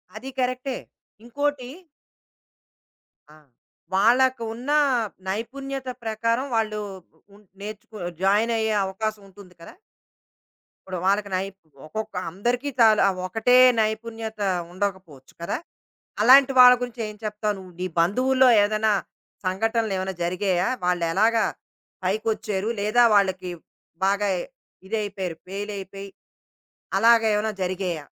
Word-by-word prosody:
అది 250 +5 -7
కరెక్టే. 255 +1 -1 0.5
ఇంకోటి 285 0 -2 1.6
ఆ! - - -16 0.6
వాళ్ళకు 240 +5 +3
ఉన్న 250 +5 -5 0.6
నైపుణ్యత 265 +6 -4
ప్రకారం 230 +3 -1
వాళ్ళు, 215 -1 0 0.6
ఉన్ 210 - -19 0.2
నేర్చుకొ 215 +1 -9 0.3
జాయినయ్యే 220 +2 +2
అవకాశం 210 +2 -4
ఉంటుంది 190 -1 -15
కదా! - - -12 1.1
ఇప్పుడు 185 -1 -4
వాళ్ళకి 200 +1 +1
నై 185 +1 0 0.4
ఒక్కొక్క 215 +6 -6 0.2
అందరికీ 240 - -1
చాలా 220 -2 +6 0.2
ఒకటే 225 +6 +2 0.2
నైపుణ్యత 220 0 -3 0.3
ఉండకపోవచ్చు 185 -8 -5
కదా! 170 - -2 0.7
అలాంటి 265 +3 +7
వాళ్ళ 250 0 +10
గురించి 245 -1 -5
ఏం 210 - -9
చెప్తావు 210 0 -2
నువ్వు? 185 -1 -12
నీ 185 - -1
బంధువుల్లో 255 +9 +3
ఏదైనా 215 +1 +1 0.5
సంఘటనలేవైనా 195 -1 -1
జరిగాయా 180 +1 0 0.2
వాళ్ళెలాగా 180 +6 +2 0.6
పైకొచ్చారు? 210 0 -1
లేదా 215 +4 +4
వాళ్ళకి 190 -2 +1 0.6
బాగా 200 +1 +1 0.6
ఇదైపోయారు 200 -5 -3
ఫెయిలయిపోయి 200 0 -6 0.9
అలాగేవైనా 220 -2 +4
జరిగాయా? 180 -4 -3
215 Hz, 95 wpm, -24 LUFS, 190-230 Hz, 1.6 s, వాళ్ళ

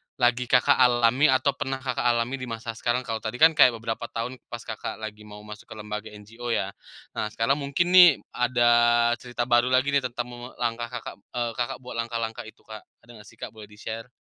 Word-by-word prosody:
lagi 120 0 +1
Kakak 125 0 +4
alami 125 +3 +4
atau 130 +1 +3
pernah 135 -1 -4
Kakak 125 -2 -1
alami 120 +3 0
di 125 - -6
masa 115 0 -5
sekarang 120 +2 -1
kalau 115 -2 -4
tadi 110 +1 -5
kan 160 +5 +6
kayak 135 -6 +5
beberapa 115 +1 -4
tahun 120 +3 -5
pas 120 -1 -8
Kakak 110 -2 -6
lagi 105 -1 -9
mau 105 0 -11
masuk 105 0 -11
ke 110 - -10
lembaga 105 0 -6
NGO, 110 +4 -10
ya. 95 - -2 0.4
Nah, - - -3
sekarang 115 +6 0
mungkin 145 +5 0
nih 180 -1 +10 0.2
ada 125 0 0 0.6
cerita 120 -1 -4
baru 120 0 +3
lagi 130 +2 +2
nih 140 - +4
tentang 120 0 -5 0.3
langkah 120 0 -2
Kakak, - - -9
eee, 120 -1 -4
Kakak 120 0 -3
buat 125 - -8
langkah-langkah 115 -1 -3
itu, 110 - -15
Kak, 110 -1 -10 0.2
ada 120 - -16
nggak 105 - -15
sih, - - -16
Kak? - - -6
Boleh 105 -1 -11
di-share? 110 +2 -8
120 Hz, 205 wpm, -25 LUFS, 110-125 Hz, 0.6 s, nih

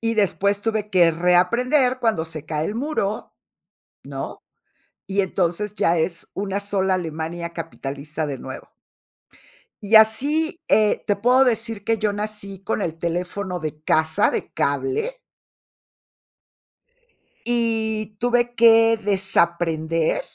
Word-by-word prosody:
Y 230 0 0
después 200 -1 +1
tuve 215 -1 -2
que 175 -3 +5
reaprender 235 - +2
cuando 225 -9 +1
se 160 -2 -6
cae 155 0 -2
el 205 - -4
muro, 230 -5 -3 0.7
¿no? - - -6 0.7
Y 200 +1 0
entonces, 190 +2 -1
ya 170 -5 +2
es 165 +1 -2
una 200 0 -3
sola 195 -2 0
Alemania 170 0 -4
capitalista 150 -2 -5
de 140 -2 -5
nuevo. - - -9 1.1
Y 205 +2 +2
así, 285 +10 +3
eh, 215 -1 +3
te 205 - +2
puedo 250 +6 +4
decir 225 -4 -1
que 225 +2 +1
yo 210 -1 0
nací 205 -2 -5
con 210 0 -2
el 165 -1 -4
teléfono 180 +2 -3
de 155 -1 -6
casa, 155 0 +2
de - - -4
cable. 140 - -1 2.3
Y 220 -3 0
tuve 240 0 +1
que 225 -1 +6
desaprender, 170 -5 +1
200 Hz, 120 wpm, -22 LUFS, 170-225 Hz, 2.3 s, que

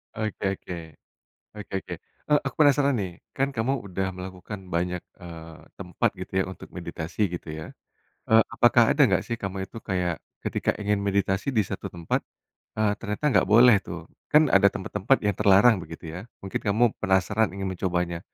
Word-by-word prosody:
Oke 110 -1 -4 0.2
oke. 90 - -7 0.8
Oke 105 -3 -10
oke, 90 - -7 0.4
eee, 150 - +6
aku - - -6
penasaran 140 -1 +4
nih. 95 -6 -2 0.2
Kan 135 +1 0
kamu 130 +1 -1
udah 95 +1 -2
melakukan 95 +2 -7
banyak, 90 +1 -1 0.2
eee, 80 -2 -10 0.2
tempat - - -1
gitu 95 - -8
ya - - +3
untuk 95 - -10
meditasi 85 +1 -6
gitu 85 - -10
ya. 80 0 -6 0.7
Eee, 110 0 +8
apakah 120 0 +4
ada 145 - +3
nggak - - +1
sih 115 - -1
kamu 95 -3 -5
itu - - -11
kayak, 90 -3 -1 0.2
ketika - - -1
ingin 105 -1 0
meditasi 100 +4 0
di 115 - +1
1 - - -5
tempat, 85 -2 -2 0.5
eee, 110 -1 +2
ternyata 105 +4 -5
enggak - - +3
boleh 115 +3 +7
tuh? 85 -3 -9 0.2
Kan 150 -2 +4
ada 100 0 +6
tempat-tempat 105 +6 0
yang 105 - +3
terlarang 105 +1 +6
begitu 80 -1 -9
ya. 85 - -6 0.2
Mungkin 95 - -3
kamu 105 +4 +3 0.2
penasaran 95 +4 +2
ingin 100 - -5
mencobanya. 90 -2 -1
100 Hz, 170 wpm, -26 LUFS, 90-110 Hz, 0.8 s, Eee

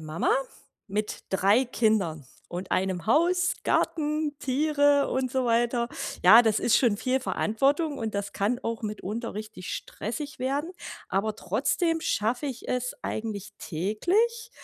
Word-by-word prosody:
Mama 155 +1 0 0.6
mit 210 +2 -3
3 200 +6 +4
Kindern 215 - 0 0.2
und 180 +2 -5
einem 185 0 0
Haus, 355 +7 +3
Garten, 300 -1 0
Tiere 285 +1 +3
und 260 -1 -1
so 260 0 0
weiter. 235 0 +1 0.4
Ja, 220 +6 +10
das 220 -2 +2
ist 230 - +3
schon 235 -5 +3
viel 255 +4 0
Verantwortung 280 +6 0
und 220 -2 -3
das 200 0 -3
kann 215 +5 0
auch 230 -1 -3
mitunter 215 +2 -4
richtig 215 -4 -7
stressig 290 +6 -5
werden. 280 +7 -1 0.4
Aber 210 +2 -1
trotzdem 305 - 0
schaffe 240 +2 0
ich 255 -3 -6
es 250 0 -1
eigentlich 215 -3 -4
täglich, 370 - 0
235 Hz, 135 wpm, -27 LUFS, 210-285 Hz, 0.6 s, Ja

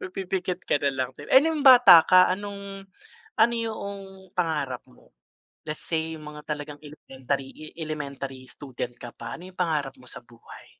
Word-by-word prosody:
Pipikit 185 -1 -3
ka - - +1
na 140 -1 +1
lang 130 -1 -1
din, 145 - -10
eh, 265 - +6
nung 320 -1 0
bata 245 - +9
ka 185 0 +6
anong, 200 0 -6 0.5
ano 230 +1 +4
yoong 200 -4 -6
pangarap 155 -9 -1
mo? 125 - -22 0.5
Let's 150 0 -6
say 160 -1 -2
yung 150 -1 -10
mga 150 0 -11
talagang 145 0 -7
elementary 135 0 -6
elementary 140 -4 -6
student 125 -3 -6
ka 120 - -8
pa 115 -1 -7
ano 180 +2 -11
yung - - -32
pangarap 155 -6 -1
mo 130 - -18
sa - - -6
buhay? 120 -1 -15
160 Hz, 165 wpm, -25 LUFS, 140-195 Hz, 0.5 s, bata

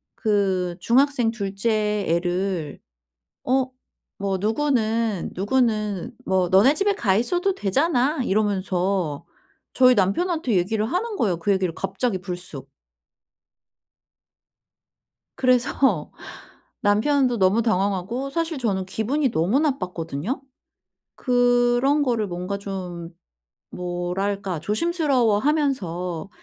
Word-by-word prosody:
그 190 -5 0
중학생 255 -1 +3
2 200 -4 -4
째 210 -1 0
애를 175 -2 -1 0.7
어 260 0 +1 0.5
뭐 195 -1 -1
"누구는 225 - 0
누구는 215 0 0
뭐 185 -2 +2
너네 205 - +5
집에 400 +4 +1
가 195 - +1
있어도 355 - +1
되잖아." 280 - +1
이러면서 190 -6 0 0.5
저희 255 -1 +6
남편한테 255 - +1
얘기를 210 +4 0
하는 410 - -2
거예요, 185 - 0
그 200 +4 +1
얘기를 185 -4 0
갑자기 195 +1 -2
불쑥. 175 -7 -7 2.7
그래서 250 - +2 0.7
남편도 245 +4 +2
너무 190 +5 +3
당황하고 205 +5 -1
사실 330 -1 -2
저는 195 -7 -1
기분이 245 +7 -1
너무 195 - +1
나빴거든요. 185 - -2 0.7
그런 245 +3 +2
거를 230 -6 0
뭔가 180 +3 -4
좀 180 -4 -6 0.6
뭐랄까? 180 +1 -3
조심스러워하면서 230 - 0
210 Hz, 225 characters per minute, -23 LUFS, 185-255 Hz, 2.7 s, 저희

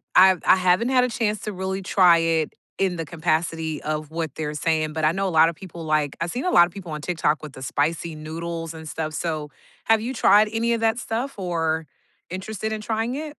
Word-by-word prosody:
I've 185 -1 +7
I - - +7
haven't 185 +6 +2
had 255 -1 +4
a - - -2
chance 215 -2 -1
to 210 - -4
really 190 +1 -3
try 180 -3 +5
it 165 -2 0 0.3
in 190 -2 +1
the 165 - -3
capacity 160 -1 -1
of 155 0 -3
what 160 -3 -4
they're 150 -1 -3
saying, 155 -1 0
but 160 -1 -3
I 155 - +4
know 195 +1 -1
a - - 0
lot 160 +1 +6
of 170 - -6
people 170 -2 -9
like 155 -2 0
I've 170 - -1
seen 255 +8 -3
a 365 - +1
lot 175 - +7
of - - -14
people 185 -5 -8
on 150 0 -5
TikTok 155 -2 0
with 150 -3 -8
the 130 - -9
spicy 160 +5 -1
noodles 165 +1 -5
and 160 -1 -9
stuff, 155 -1 -4
so 155 -3 -3 0.4
have 225 -1 +4
you 245 +4 -3
tried 210 -3 +5
any 230 +1 +1
of 230 - -1
that 225 +1 +2
stuff 235 +1 -4
or 165 -3 -1 0.4
interested 215 +4 -4
in 215 - -4
trying 225 +3 -2
it? 300 0 -5
170 Hz, 235 wpm, -23 LUFS, 160-210 Hz, 0.4 s, I've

